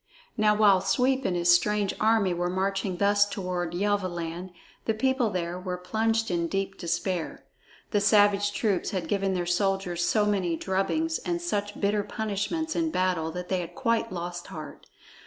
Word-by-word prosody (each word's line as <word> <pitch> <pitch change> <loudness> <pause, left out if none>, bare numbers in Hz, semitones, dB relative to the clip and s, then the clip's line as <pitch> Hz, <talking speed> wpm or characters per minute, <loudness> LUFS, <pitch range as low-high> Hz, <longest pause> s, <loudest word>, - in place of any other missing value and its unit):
Now 210 -1 +3
while 205 -3 +5
Sweep 255 +7 +1
and 180 - +1
his 175 0 +4
strange 205 +3 +2
army 215 -4 +3
were 175 +1 -1
marching 190 0 -1
thus 205 +1 +4
toward 180 -3 -3
Yelvaland, 180 -3 -2 0.4
the 220 - 0
people 260 0 +1
there 180 -2 -3
were 180 -1 -4
plunged 225 +3 0
in 170 -1 0
deep 195 +2 -2
despair. 170 0 -3 0.5
The 205 - +2
savage 205 -1 +4
troops 205 -3 0
had 185 -3 -3
given 195 -2 0
their 175 -1 -1
soldiers 180 -1 0
so 210 +3 +2
many 190 -5 0
drubbings 255 - -1
and 345 -1 -2
such 205 -12 -3
bitter 205 +1 +1
punishments 220 - -3
in 330 -1 +1
battle 185 - 0
that 180 0 -6
they 185 - +1
had 175 0 -6
quite 230 0 0
lost 175 -1 -5
heart. 155 -1 -9
195 Hz, 165 wpm, -27 LUFS, 180-210 Hz, 0.5 s, while